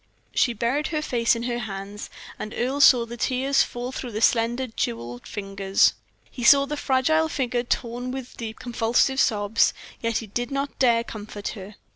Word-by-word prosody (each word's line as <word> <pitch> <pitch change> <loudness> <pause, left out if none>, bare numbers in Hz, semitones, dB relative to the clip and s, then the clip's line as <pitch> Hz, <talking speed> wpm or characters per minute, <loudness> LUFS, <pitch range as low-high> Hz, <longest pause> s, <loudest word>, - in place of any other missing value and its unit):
She 240 - +2
buried 240 +7 0
her 305 -2 -2
face 235 -4 +2
in 230 - -4
her 240 0 -2
hands, 200 -1 -6 0.3
and 215 - -6
Earle 265 +4 0
saw 245 -4 +7
the 235 +1 -8
tears 265 +3 +2
fall 245 +1 -3
through 250 -3 -6
her 215 - -3
slender, 240 +1 +2
jeweled 120 - -4
fingers. 195 -1 +1 0.4
He 245 - -7
saw 275 +3 +7
the 295 +2 -4
fragile 305 +4 +2
figure 250 -5 -1
torn 245 +1 -2
with 260 -1 -6
deep, 220 -2 -6
convulsive 240 +3 +1
sobs, 210 +1 +2 0.3
yet 230 -1 0
he 225 - -4
did 240 +4 -3
not 275 0 -3
dare 235 -3 +4
comfort 210 -2 -7
her. 200 0 -9
240 Hz, 175 wpm, -24 LUFS, 215-260 Hz, 0.4 s, saw